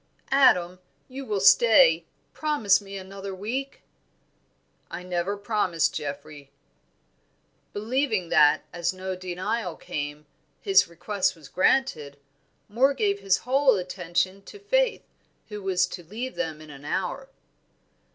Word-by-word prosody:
"Adam, 185 -10 +4 0.3
you 270 +1 -8
will 210 -6 -2
stay? 485 - +6 0.3
Promise 285 -11 +2
me 195 0 -8
another 195 0 -8
week?" 250 +8 -5 1.1
"I 180 - -7
never 180 +3 -2
promise, 200 -6 0
Geoffrey." 145 0 -7 1.2
Believing 220 -4 -1
that, 150 0 +5
as 175 +1 -1
no 185 0 -5
denial 185 +1 -3
came, 145 0 -6 0.3
his 390 -1 +4
request 185 +4 -1
was 155 -4 -15
granted, 155 - +1 0.5
Moor 260 +6 +2
gave 205 -5 0
his 195 -1 +2
whole 270 +1 +4
attention 185 +1 -2
to - - -11
Faith, 485 +4 0 0.5
who 210 -1 -7
was 185 -2 +1
to 180 0 -9
leave 230 +9 -6
them 155 -1 -4
in 155 -1 -12
an 140 -1 -12
hour. - - -3
195 Hz, 120 wpm, -25 LUFS, 175-250 Hz, 1.2 s, stay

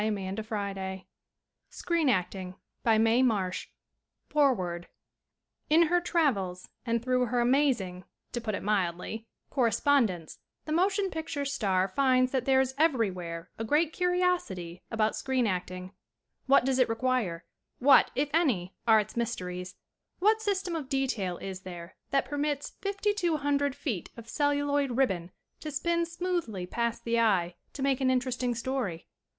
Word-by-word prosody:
CHAMBER 200 -3 -2
OF 220 - -6
COMMERCE 195 -3 -4 0.8
BUILDING 195 - 0 0.3
All 225 -1 +5
Rights 220 - +4
Reserved 225 -6 +2 0.6
FOREWORD 185 - +1 0.8
IN 320 +3 +6
her 355 0 +3
travels 210 - 0
and 230 -1 -1
through 250 -1 +2
her 245 +2 0
amazing 240 -8 +1 0.3
to 240 - -3
put 215 -3 -2
it - - -5
mildly 205 +2 -1 0.2
correspondence, 230 - +1 0.3
the 305 - -5
mo 355 +5 +4
tion 390 -1 -1
picture 315 -3 -3
star 195 -9 +1
finds 255 +3 +2
that 260 -3 0
there 265 -1 +4
is 265 0 +1
every 260 -11 +3
where 170 -1 -7
a - - -1
great 300 +7 +2
curiosity 355 - 0
about 220 -1 +1
screen 260 -2 0
acting. 185 -1 -3 0.5
What 270 -1 +5
does 265 -1 +1
it 255 - +4
require? 225 -8 -1 0.3
What, 275 +2 +6
if 290 +2 0
any, 235 - +1
are 220 -1 +7
its 210 - -4
mysteries? 185 -6 -3 0.4
What 430 +4 +3
system 385 -4 -1
of 295 -5 -4
detail 245 -10 -1
is 190 -1 -6
there 175 -2 -9
that 275 -1 +2
permits 290 0 -2
fifty 400 +1 0
two 345 -6 0
hundred 285 -1 0
feet 225 - -3
of 230 -1 -10
celluloid 285 -2 +1
ribbon 185 -10 +1 0.3
to 310 - -5
spin 335 +3 0
smoothly 335 - -2
past 235 +4 -2
the 235 0 +1
eye 190 -6 +2 0.2
to 270 - -4
make 275 -1 +1
an 260 - +3
interesting 250 -1 0
story 230 -8 -3
245 Hz, 150 wpm, -29 LUFS, 190-285 Hz, 0.8 s, are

